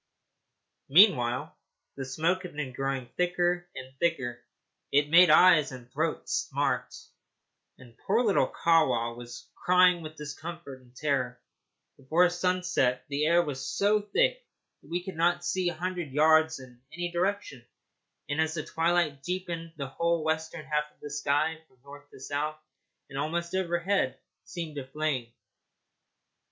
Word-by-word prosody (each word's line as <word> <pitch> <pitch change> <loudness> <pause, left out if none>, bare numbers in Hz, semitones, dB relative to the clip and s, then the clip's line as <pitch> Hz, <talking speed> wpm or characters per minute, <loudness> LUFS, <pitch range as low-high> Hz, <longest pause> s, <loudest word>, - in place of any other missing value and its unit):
Meanwhile 135 - +4 0.4
the 135 - -5
smoke 165 +8 0
had 180 -5 -9
been 145 -4 -4
growing 135 -2 -3
thicker 175 0 0
and 130 0 -9
thicker. 125 -8 -1 0.5
It 145 +1 +2
made 175 +1 +8
eyes 155 -2 +6
and 125 -1 -11
throat 155 +3 -2
smart, - - -1 0.8
and 120 -3 -16
poor 225 +5 +3
little 210 -5 +3
Kahwa 125 -9 +2
was 120 0 -10
crying 180 -1 +4
with 155 -1 -8
discomfort 150 -1 -8
and 125 0 -23
terror. 130 -3 -1 0.6
Before 160 +7 +3
sunset 180 -8 0
the 145 +1 0
air 170 +1 +4
was 140 -4 -5
so 210 +1 +3
thick - - +1 0.4
that - - -19
we 175 +1 -2
could 190 -1 -7
not 175 +1 +1
see 180 0 0
a 175 - -6
hundred 175 -3 -4
yards 160 +1 +4
in 125 -2 -14
any 175 +1 -4
direction, 175 -7 -2 0.6
and 145 +2 0
as 160 0 -1
the 155 - -3
twilight 165 -4 0
deepened 170 0 -4
the 140 - -3
whole 170 +4 -1
western 160 0 -2
half 150 -1 -1
of - - -35
the 145 - -8
sky, 150 +2 0
from 130 - -30
north 145 +1 -13
to - - -15
south 145 +3 -3 0.5
and 140 -1 -6
almost 170 +3 -2
overhead, 180 -3 0 0.3
seemed 165 -4 -6
to - - -2
be 130 - -19
aflame. 145 -4 -2
160 Hz, 150 wpm, -28 LUFS, 140-175 Hz, 0.8 s, made